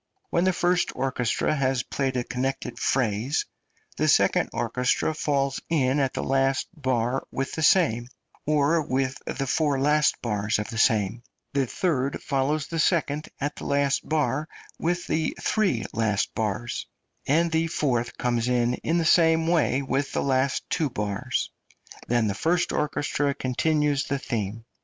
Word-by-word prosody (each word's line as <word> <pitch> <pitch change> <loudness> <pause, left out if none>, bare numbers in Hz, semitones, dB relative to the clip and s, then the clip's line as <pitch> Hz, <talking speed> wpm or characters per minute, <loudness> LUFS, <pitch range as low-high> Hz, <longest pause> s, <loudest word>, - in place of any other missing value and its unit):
When 170 +2 +2
the 185 - +4
first 180 0 +1
orchestra 130 0 0
has 130 -3 0
played 135 -2 -2
a 125 - 0
connected 125 -1 -3
phrase 125 +2 0 0.5
the - - +1
second - - +3
orchestra 125 +6 0
falls 140 -3 0
in 140 -4 +2
at 135 -2 0
the - - -2
last 135 0 +1
bar 130 -4 -1
with 135 0 -3
the 160 - -3
same, 135 -9 +3 0.4
or 155 +2 +3
with 130 -2 -1
the 135 - -2
four 145 0 +1
last 150 +2 +3
bars 105 -2 0
of 105 +2 -4
the 115 - -3
same, 110 -1 +2 0.3
the 140 -2 +1
third 140 -3 -1
follows 140 +2 0
the 165 - -4
second 155 -3 +1
at 145 +1 -3
the - - -7
last 140 -1 0
bar 155 -1 0 0.3
with 175 +2 -1
the 160 -1 -1
three 190 - +1
last 105 -3 0
bars, 110 +2 -3 0.4
and 165 +4 +3
the 160 +1 +1
fourth 125 -7 -1
comes 120 -1 0
in 120 -1 +2
in 165 +2 +1
the 165 - +1
same 160 0 +4
way 160 -5 +2
with 135 +1 -1
the - - 0 0.5
two 155 -4 +1
last - - -24
bars; 105 -2 -2 0.6
then 120 -1 +2
the 100 - 0
first 170 - +1
orchestra 145 -1 -1
continues 145 +2 +1
the 140 - -1
theme. 115 -3 -4
135 Hz, 155 wpm, -25 LUFS, 120-155 Hz, 0.6 s, the